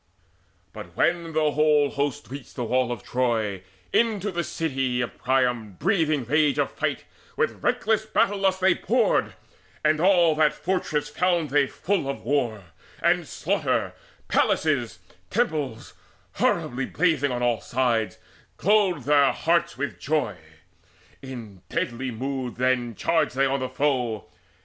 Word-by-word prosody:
But 85 +1 -10
when 170 -1 +1
the 155 -1 +2
whole 150 -1 +3
host 140 -1 -3
reached 140 -1 -9
the 125 - -3
walls 125 +1 +1
of 120 -2 -5
Troy, 115 -6 -1 0.3
Into 210 -3 +1
the 175 -1 -2
city 135 -7 -1
of 120 - -4
Priam, 125 -5 0
breathing 155 - +1
rage 150 +3 +2
Of - - 0
fight, - - -2 0.3
with 470 0 -1
reckless 220 0 +1
battle 205 -2 +1
lust 190 -1 +1
they 190 -1 +5
poured; - - +1 0.5
And 155 0 +3
all 175 -3 +5
that 155 -1 +4
fortress 155 -5 -1
found 170 -2 0
they 145 -1 +3
full 180 -5 -2
of 140 - -5
war 120 -6 0 0.4
And - - +2
slaughter, - - -1 0.3
palaces, - - +1 0.3
temples, 140 -8 -2 0.4
horribly 125 +2 0
Blazing 155 -4 +1
on 125 0 -2
all 120 -2 +1
sides; 120 -3 0 0.4
glowed 195 -7 +2
their 145 0 +4
hearts 170 -3 0
with 145 +1 -4
joy. 155 +1 -1 0.9
In 115 -8 -9
deadly 125 +2 -2
mood 130 +1 -4
then 125 -2 0
charged 160 -1 +1
they 135 +1 +3
on 135 +1 0
the 130 0 -3
foe. 125 -7 -1
140 Hz, 140 wpm, -25 LUFS, 125-165 Hz, 0.9 s, they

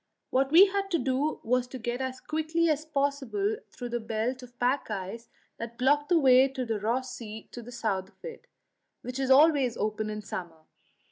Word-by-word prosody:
What 270 +1 +2
we 350 +5 +9
had 395 0 -2
to 345 - +2
do 270 +3 0
was 250 +2 +1
to 260 - -7
get 240 +1 -3
as 260 0 -4
quickly 315 +2 0
as 305 +1 -1
possible 285 - -1
through 245 -1 -7
the 240 0 -2
belt 225 +3 -2
of 245 -1 -14
pack 250 +2 0
ice 210 +3 -5 0.3
that 230 0 -7
blocked 290 +3 +2
the 350 - +5
way 260 -3 +6
to 265 -2 -4
Ross 250 +4 -1
Sea 220 -2 -8
to 240 - -8
the 240 +1 -11
south 200 -6 -2
of - - -17
it, 475 -1 -9 0.6
which 250 +2 -5
is 265 -1 -1
always 275 -3 +5
open 215 0 -2
in 210 0 -5
summer. 170 -5 -7
255 Hz, 195 wpm, -28 LUFS, 230-290 Hz, 0.6 s, we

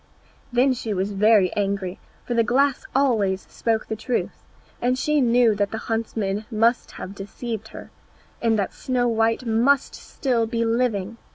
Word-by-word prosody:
Then 255 +2 +3
she 225 -4 -3
was 190 +2 -1
very 205 -2 +4
angry, 195 -2 -2 0.3
for 245 - -2
the 235 - +3
glass 270 +4 +1
always 215 -9 +2
spoke 225 -1 -1
the 220 - -4
truth, 235 +3 -3 0.4
and 250 +1 +1
she 300 +2 +1
knew 240 -2 +4
that 205 -1 0
the 220 - -4
huntsman 220 -2 -2
must 230 +2 +1
have 190 - -7
deceived 220 +2 -6
her, - - -11 0.5
and 225 -1 +2
that 200 -2 -1
Snow 250 -2 0
white 225 +1 +1
must 240 +5 +2
still 240 -4 -1
be 230 0 -1
living. 225 -3 0
225 Hz, 160 wpm, -23 LUFS, 205-245 Hz, 0.5 s, very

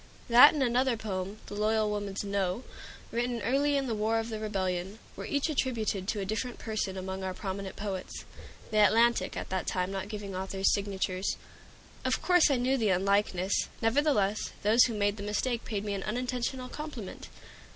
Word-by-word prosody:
That 250 +6 +9
and 285 - +1
another 250 0 +2
poem, 195 -1 -4
"The - - -9
Loyal 215 +1 +1
Woman's 205 -1 -3
No," 200 +2 -1 0.5
written 240 0 -1
early 280 +3 +2
in 275 - 0
the 240 - -1
War 220 +1 +1
of 225 +1 -2
the 220 -1 -4
Rebellion, 190 -2 -2 0.2
were - - -6
each 285 +1 0
attributed 230 - -1
to 210 - -1
a 195 - -2
different 220 +5 -3
person 215 -4 -3
among 190 0 -4
our 185 -1 -3
prominent 195 0 -5
poets, 195 -3 -5 0.5
the 215 - +2
"Atlantic" 230 +3 +3
at - - -5
that 185 -1 -2
time 180 +1 -1
not 195 +1 -4
giving 205 -3 -6
authors' 190 +1 +1
signatures. 195 -1 -1 0.7
Of - - +1
course 355 -3 +4
I 275 - +3
knew 255 +2 +1
the 220 -3 +2
unlikeness; 195 0 +1 0.3
nevertheless, 225 -4 +1
those 220 +4 +6
who 230 - -2
made 205 0 +1
the - - -6
mistake 230 +4 -1
paid 210 -2 -3
me 205 - -2
an 195 - -3
unintentional 250 +3 -2
compliment. 290 -10 -7
210 Hz, 180 wpm, -30 LUFS, 195-240 Hz, 0.7 s, That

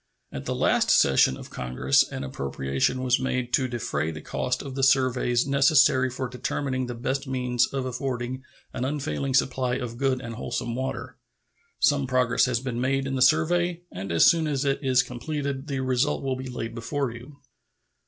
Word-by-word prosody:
At 70 - -6
the - - -2
last - - +2
session 65 -1 +4
of - - -11
Congress 65 +2 +2
an - - -5
appropriation 70 - -2
was 125 -1 +2
made 125 -1 -2
to 130 - +2
defray 120 -9 -2
the 80 -1 -6
cost - - -2
of 135 - -7
the 135 - -3
surveys 130 -2 +3
necessary 140 -2 +4
for 130 +1 -4
determining 130 +1 -3
the 120 - -5
best 135 +4 -3
means 125 -2 +1
of 135 -2 -3
affording 130 0 -3 0.3
an 125 - -3
unfailing 140 -1 -2
supply 130 -2 +1
of 120 -2 -5
good 135 -2 +1
and 115 -3 -7
wholesome 120 +1 -4
water. 130 +2 -4 0.6
Some 140 -2 +2
progress 125 -1 +2
has 125 -3 0
been 120 -2 -4
made 135 +1 0
in 135 - -3
the 130 - -1
survey, 170 +5 +2
and 95 0 -6
as 85 - +5
soon 165 -2 +4
as 140 -1 -1
it 135 -1 +1
is 130 -1 +3
completed 140 +2 -4
the 135 -3 -2
result 130 +3 0
will 135 -1 -1
be 130 0 -6
laid 115 -2 -5
before 130 +3 -2
you. 125 +5 -11
130 Hz, 185 wpm, -26 LUFS, 120-135 Hz, 0.6 s, as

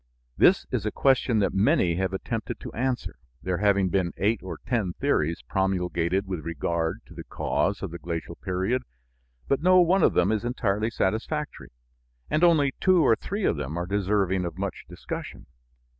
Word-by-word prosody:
This - - +4
is - - -1
a - - -1
question 130 -3 +2
that 100 - +1
many 95 -3 +3
have 95 0 0
attempted 110 +4 -4
to - - -8
answer, 125 0 -2 0.3
there 90 -1 -1
having 100 -2 +3
been 90 -2 0
eight 105 +2 +1
or 95 - -6
ten 110 -8 -1
theories 85 - 0
promulgated 95 -1 0
with 95 -3 -4
regard 85 0 -2
to - - -15
the - - -8
cause 100 +1 -1
of 95 - -4
the 85 - -7
glacial 85 0 -5
period, 95 +8 -1 0.7
but 140 - +1
no 185 +2 +6
one 180 +2 +4
of - - +4
them 90 +3 +3
is 110 -1 0
entirely 110 -3 0
satisfactory, 115 +9 -2 0.6
and 155 - +2
only 150 -6 +4
two 185 -3 +4
or 115 - +5
three 200 - -4
of - - +1
them 75 +3 -4
are 85 - -2
deserving 95 -1 0
of 85 - -5
much - - -4
discussion. - - -7
100 Hz, 175 wpm, -26 LUFS, 90-125 Hz, 0.7 s, no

